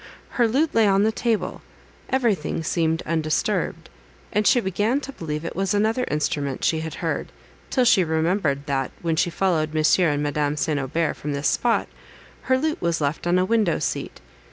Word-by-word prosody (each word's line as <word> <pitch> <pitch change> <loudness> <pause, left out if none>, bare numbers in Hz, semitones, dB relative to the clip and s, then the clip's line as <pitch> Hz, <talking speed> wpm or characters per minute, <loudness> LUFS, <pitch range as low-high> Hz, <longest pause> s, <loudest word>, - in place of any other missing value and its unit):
Her 240 -2 +2
lute 285 +8 +1
lay 225 -2 +4
on 195 0 +3
the 220 - +3
table; 220 -4 -1 0.5
everything 220 - 0
seemed 160 0 0
undisturbed, 155 -1 -1 0.5
and 210 0 +2
she 245 - +5
began 210 +5 0
to 275 -1 -7
believe 155 - -5
it - - -5
was 195 +2 0
another 220 +4 +1
instrument 145 -2 -2
she 160 - +2
had 160 0 -5
heard, - - -2 0.4
till 255 -2 +2
she 195 -5 +5
remembered, 160 -3 0
that, 135 -3 -1
when 165 -1 +1
she 165 - +1
followed 160 -3 0
M. 155 0 +2 0.2
and 145 -1 0
Madame 145 0 -1
St. 150 0 0
Aubert 155 +4 -1
from 150 0 -4
this 140 +1 -1
spot, 240 -1 +1 0.6
her 260 - +5
lute 310 +3 -1
was 170 -1 0
left 145 +3 -2
on 175 +1 +3
a 185 - +2
window 210 -5 +2
seat. - - -4
170 Hz, 180 wpm, -23 LUFS, 150-215 Hz, 0.6 s, she